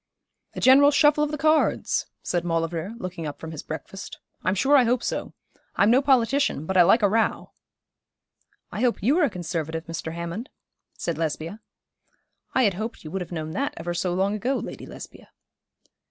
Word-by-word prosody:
'A -, -, -5 dB
general 275 Hz, +2 st, +7 dB
shuffle 295 Hz, +1 st, +4 dB
of 300 Hz, -, 0 dB
the 300 Hz, -, -3 dB
cards,' 310 Hz, +2 st, +2 dB, 0.2 s
said 175 Hz, -1 st, -1 dB
Maulevrier, 165 Hz, +4 st, -2 dB
looking 185 Hz, -6 st, -5 dB
up 145 Hz, -, -7 dB
from 160 Hz, -, -7 dB
his 155 Hz, -, -6 dB
breakfast. 195 Hz, +5 st, -8 dB, 0.3 s
'I'm 185 Hz, -, +1 dB
sure 270 Hz, +9 st, +3 dB
I 265 Hz, -, +7 dB
hope 245 Hz, +1 st, +1 dB
so. -, -, -3 dB, 0.4 s
I'm 205 Hz, +3 st, +4 dB
no 255 Hz, +3 st, +5 dB
politician, 270 Hz, -, +2 dB
but 190 Hz, -, -3 dB
I 180 Hz, -, +7 dB
like 195 Hz, +6 st, +5 dB
a -, -, +6 dB
row.' 220 Hz, +2 st, 0 dB, 1.2 s
'I -, -, -4 dB
hope 245 Hz, -6 st, +1 dB
you 280 Hz, -, +3 dB
are 330 Hz, -, +5 dB
a -, -, 0 dB
Conservative, 165 Hz, -3 st, -4 dB
Mr. 165 Hz, -1 st, -5 dB
Hammond,' 170 Hz, -, -5 dB, 0.5 s
said 165 Hz, -2 st, -3 dB
Lesbia. 165 Hz, +5 st, -3 dB, 1.0 s
'I 260 Hz, -, +4 dB
had 205 Hz, -4 st, +3 dB
hoped 220 Hz, +5 st, -5 dB
you 155 Hz, -, -8 dB
would 190 Hz, -, -3 dB
have 180 Hz, -, -7 dB
known 160 Hz, -2 st, -4 dB
that 280 Hz, -, -2 dB
ever 175 Hz, +2 st, -3 dB
so 175 Hz, +1 st, -1 dB
long 190 Hz, +3 st, +1 dB
ago, 245 Hz, +6 st, -1 dB
Lady -, -, -6 dB
Lesbia.' -, -, -11 dB
195 Hz, 185 wpm, -25 LUFS, 165-255 Hz, 1.2 s, general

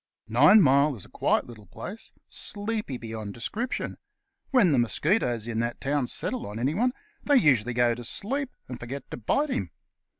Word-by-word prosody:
Ninemile 140 Hz, -, +6 dB
is 95 Hz, -, -7 dB
a -, -, -17 dB
quiet -, -, +1 dB
little 110 Hz, -4 st, -13 dB
place, 210 Hz, +5 st, -8 dB, 0.2 s
sleepy 210 Hz, -, -4 dB
beyond 110 Hz, -3 st, -6 dB
description. 225 Hz, -, -3 dB, 0.5 s
When 240 Hz, -, +4 dB
the 135 Hz, -, +3 dB
mosquitoes 120 Hz, -, +1 dB
in 115 Hz, -1 st, -2 dB
that 120 Hz, +1 st, -2 dB
town 140 Hz, -2 st, 0 dB
settle 255 Hz, -, -2 dB
on 105 Hz, +1 st, -7 dB
anyone, 165 Hz, -, +1 dB, 0.3 s
they 290 Hz, -, +3 dB
usually 125 Hz, -, +3 dB
go 120 Hz, -1 st, +3 dB
to 120 Hz, +1 st, -7 dB
sleep, 265 Hz, -, -2 dB, 0.2 s
and 125 Hz, -1 st, -7 dB
forget 130 Hz, +3 st, -7 dB
to -, -, -5 dB
bite 280 Hz, -, 0 dB
him. 95 Hz, -, -2 dB
135 Hz, 165 wpm, -27 LUFS, -, 0.5 s, Ninemile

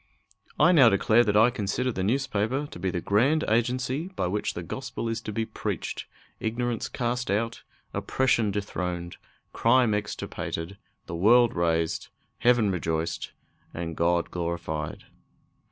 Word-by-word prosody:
I 175 Hz, -, +6 dB
now 140 Hz, -9 st, +7 dB
declare 110 Hz, +3 st, +4 dB
that 105 Hz, -2 st, +2 dB
I 115 Hz, +3 st, +6 dB
consider 120 Hz, +3 st, -1 dB
the 95 Hz, -, -3 dB
newspaper 130 Hz, +3 st, 0 dB
to -, -, -9 dB
be 95 Hz, +2 st, -1 dB
the 90 Hz, -1 st, -2 dB
grand 135 Hz, -, +2 dB
agency 125 Hz, +7 st, 0 dB
by 190 Hz, -, -3 dB
which 100 Hz, +4 st, -2 dB
the -, -, -4 dB
Gospel 115 Hz, -, -5 dB
is 115 Hz, 0 st, -2 dB
to 110 Hz, -, -5 dB
be 110 Hz, +2 st, -1 dB
preached, -, -, -4 dB, 0.3 s
ignorance 115 Hz, +1 st, -2 dB
cast 125 Hz, +1 st, -2 dB
out, 115 Hz, +3 st, -1 dB, 0.3 s
oppression 125 Hz, -5 st, +1 dB
dethroned, 90 Hz, -3 st, -3 dB, 0.4 s
crime 115 Hz, -1 st, +4 dB
extirpated, 100 Hz, -3 st, -4 dB, 0.3 s
the -, -, -7 dB
world 115 Hz, +7 st, +5 dB
raised, 85 Hz, -1 st, 0 dB, 0.3 s
heaven 120 Hz, -4 st, +4 dB
rejoiced, 80 Hz, -2 st, -2 dB, 0.4 s
and 85 Hz, -1 st, -4 dB
God 85 Hz, +1 st, +1 dB
glorified. 85 Hz, -3 st, -3 dB
105 Hz, 135 wpm, -27 LUFS, 90-120 Hz, 0.4 s, now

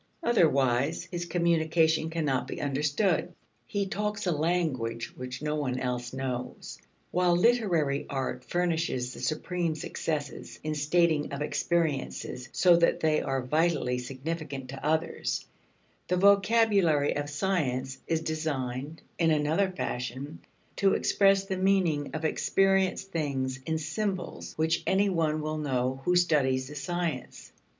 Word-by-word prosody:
Otherwise 140 Hz, -, +2 dB
his 175 Hz, -1 st, -3 dB
communication 160 Hz, -2 st, +2 dB
cannot 150 Hz, -6 st, -1 dB
be -, -, -5 dB
understood. 150 Hz, +6 st, 0 dB, 0.4 s
He 200 Hz, -1 st, -1 dB
talks 210 Hz, +2 st, -2 dB
a 180 Hz, -, +2 dB
language 150 Hz, -8 st, -1 dB
which 125 Hz, +2 st, -7 dB
no 150 Hz, 0 st, 0 dB
one 130 Hz, -4 st, -1 dB
else 125 Hz, -1 st, -3 dB
knows. 130 Hz, -1 st, -5 dB, 0.3 s
While 180 Hz, -1 st, +3 dB
literary 175 Hz, -10 st, +2 dB
art 135 Hz, -2 st, -3 dB
furnishes 165 Hz, -8 st, -1 dB
the -, -, -10 dB
supreme 170 Hz, +1 st, -1 dB
successes 150 Hz, -1 st, -4 dB
in 155 Hz, 0 st, -1 dB
stating 155 Hz, 0 st, +2 dB
of 140 Hz, +1 st, -3 dB
experiences 150 Hz, -6 st, -1 dB
so 175 Hz, -2 st, +5 dB
that 170 Hz, 0 st, +2 dB
they 155 Hz, -1 st, +2 dB
are 135 Hz, -1 st, -1 dB
vitally 150 Hz, -3 st, +1 dB
significant 135 Hz, +1 st, -5 dB
to 135 Hz, 0 st, -8 dB
others, 160 Hz, +2 st, -1 dB, 0.6 s
the 180 Hz, -, +1 dB
vocabulary 200 Hz, -6 st, +4 dB
of 145 Hz, 0 st, -2 dB
science 135 Hz, -6 st, -1 dB
is 165 Hz, -1 st, 0 dB
designed, 150 Hz, -2 st, -3 dB, 0.2 s
in 165 Hz, -1 st, +4 dB
another 155 Hz, +5 st, +2 dB
fashion, 135 Hz, -3 st, -4 dB, 0.4 s
to 195 Hz, -1 st, +3 dB
express 195 Hz, -1 st, +3 dB
the 190 Hz, -1 st, -3 dB
meaning 185 Hz, -7 st, +1 dB
of 160 Hz, +1 st, -3 dB
experienced 195 Hz, +3 st, +1 dB
things 135 Hz, -5 st, -2 dB
in 160 Hz, 0 st, 0 dB
symbols 185 Hz, +4 st, -4 dB
which 160 Hz, +1 st, +1 dB
any 195 Hz, +1 st, +3 dB
one 155 Hz, -4 st, 0 dB
will 155 Hz, 0 st, -3 dB
know 130 Hz, -2 st, -1 dB
who 180 Hz, -, +3 dB
studies 140 Hz, -7 st, +2 dB
the 150 Hz, -, -9 dB
science. 170 Hz, -3 st, -4 dB
155 Hz, 130 wpm, -28 LUFS, 135-175 Hz, 0.6 s, so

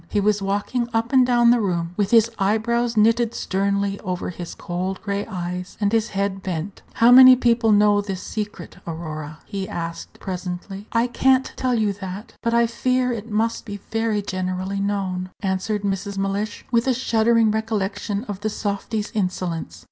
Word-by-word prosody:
He 210 Hz, -, +1 dB
was 205 Hz, 0 st, +2 dB
walking 205 Hz, +5 st, -1 dB
up 230 Hz, +3 st, 0 dB
and 255 Hz, -2 st, +6 dB
down 240 Hz, -1 st, +5 dB
the 240 Hz, -1 st, +3 dB
room, 170 Hz, -4 st, -1 dB
with 200 Hz, -1 st, 0 dB
his 230 Hz, 0 st, +5 dB
eyebrows 230 Hz, +4 st, +1 dB
knitted 230 Hz, +2 st, +3 dB
sternly 200 Hz, +1 st, -1 dB
over 180 Hz, -2 st, -3 dB
his 175 Hz, -1 st, -7 dB
cold 185 Hz, +2 st, -4 dB
gray 200 Hz, -1 st, -2 dB
eyes, 180 Hz, -2 st, -5 dB
and 205 Hz, -1 st, +1 dB
his 225 Hz, 0 st, +2 dB
head 195 Hz, -1 st, -2 dB
bent. 185 Hz, +1 st, -4 dB
"How 235 Hz, +1 st, +5 dB
many 255 Hz, 0 st, +10 dB
people 235 Hz, -2 st, +2 dB
know 205 Hz, 0 st, +5 dB
this 195 Hz, -2 st, -4 dB
secret, 210 Hz, -5 st, -6 dB
Aurora?" 155 Hz, -2 st, -6 dB
he 195 Hz, -1 st, -5 dB
asked, 165 Hz, 0 st, -6 dB
presently. 190 Hz, +2 st, -6 dB
"I 230 Hz, 0 st, +2 dB
can't 260 Hz, +2 st, +2 dB
tell 255 Hz, -1 st, 0 dB
you 215 Hz, -3 st, +1 dB
that; 195 Hz, +2 st, -8 dB
but 230 Hz, -, 0 dB
I 235 Hz, 0 st, +4 dB
fear 255 Hz, +2 st, 0 dB
it 230 Hz, -1 st, -5 dB
must 225 Hz, +2 st, 0 dB
be 205 Hz, -3 st, -6 dB
very 225 Hz, -2 st, 0 dB
generally 185 Hz, 0 st, -3 dB
known," 190 Hz, -2 st, -2 dB
answered 195 Hz, +1 st, -1 dB
Mrs. 200 Hz, 0 st, -2 dB
Mellish, 200 Hz, +2 st, -2 dB
with 235 Hz, +1 st, +2 dB
a 260 Hz, -, +3 dB
shuddering 230 Hz, -2 st, +3 dB
recollection 210 Hz, -1 st, -2 dB
of 205 Hz, -6 st, -6 dB
the 215 Hz, +1 st, -1 dB
softy's 205 Hz, +1 st, -3 dB
insolence. 175 Hz, -, -2 dB
205 Hz, 170 wpm, -22 LUFS, 190-230 Hz, -, many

